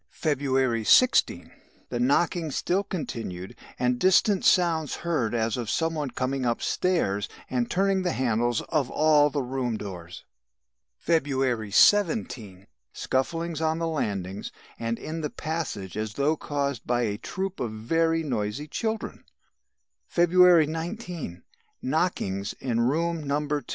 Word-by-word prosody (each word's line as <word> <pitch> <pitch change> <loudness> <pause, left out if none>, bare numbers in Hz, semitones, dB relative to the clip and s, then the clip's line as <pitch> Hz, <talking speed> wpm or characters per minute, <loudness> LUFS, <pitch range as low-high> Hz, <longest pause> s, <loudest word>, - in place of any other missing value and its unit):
"February 135 -6 0
16. 180 - +4 0.4
The 120 - -3
knockings 155 +4 +1
still 190 +3 0
continued 115 - -5 0.2
and 125 0 0
distant 190 - +4
sounds 165 -4 +3
heard 130 -10 0
as 115 0 0
of 120 -3 -4
some 165 0 0
one 150 -4 -2
coming 130 +2 -2
upstairs 120 - 0 0.2
and 125 -2 0
turning 195 0 +1
the 180 -1 -1
handles 120 -1 0
of 150 -6 0
all 150 -1 +4
the 145 -1 -2
room 125 -3 -2
doors. 90 -4 -8 0.7
"February 135 -8 0
17. 120 - +2 0.3
Scufflings 165 +4 -2
on 160 0 +1
the 165 0 -1
landings, 100 - -3 0.3
and 115 0 -2
in 160 +1 -5
the 150 - -2
passage 140 - -4
as 105 0 -4
though 145 +3 +2
caused 140 -5 -3
by 120 0 +1
a 105 -2 -2
troop 190 +7 -4
of 120 - -2
very 165 +9 0
noisy 120 +1 -3
children. 220 +7 -3 0.8
"February 175 -1 +5
19. 165 - -5 0.4
Knockings 130 - -1
in 120 -3 -1
room 165 +6 0
No. 145 0 0
2. 145 0 -1
140 Hz, 130 wpm, -26 LUFS, 115-165 Hz, 0.8 s, February